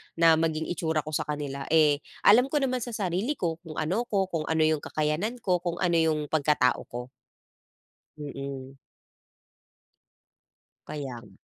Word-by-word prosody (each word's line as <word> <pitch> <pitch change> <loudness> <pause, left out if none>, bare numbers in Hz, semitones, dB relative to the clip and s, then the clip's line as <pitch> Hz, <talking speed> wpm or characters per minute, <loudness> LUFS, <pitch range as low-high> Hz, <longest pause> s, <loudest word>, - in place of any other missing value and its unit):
na 165 -1 +5
maging 160 -1 -1
itsura 160 -3 0
ko 155 - -7
sa 150 - -1
kanila? 145 -2 -4
Eh 150 -3 +5 0.2
alam 235 +5 +7
ko 295 +1 0
naman 255 -2 0
sa 240 0 -5
sarili 195 - -1
ko 165 -3 -2
kung 155 - -8
ano 185 +11 -1
ako, 195 -2 0
kung 160 -2 -2
ano 160 0 +1
yung 155 -1 +2
kakayahan 155 +10 -1
ko, 180 -2 +2
kung 175 -1 -3
ano 175 -2 +3
yung 155 -2 +1
pagkatao 145 -5 +2
ko. 120 +1 -7 1.1
Mhm. 140 -2 -7 2.1
Kaya 140 -4 -5
nga. 105 - -16
160 Hz, 150 wpm, -27 LUFS, 150-180 Hz, 2.1 s, alam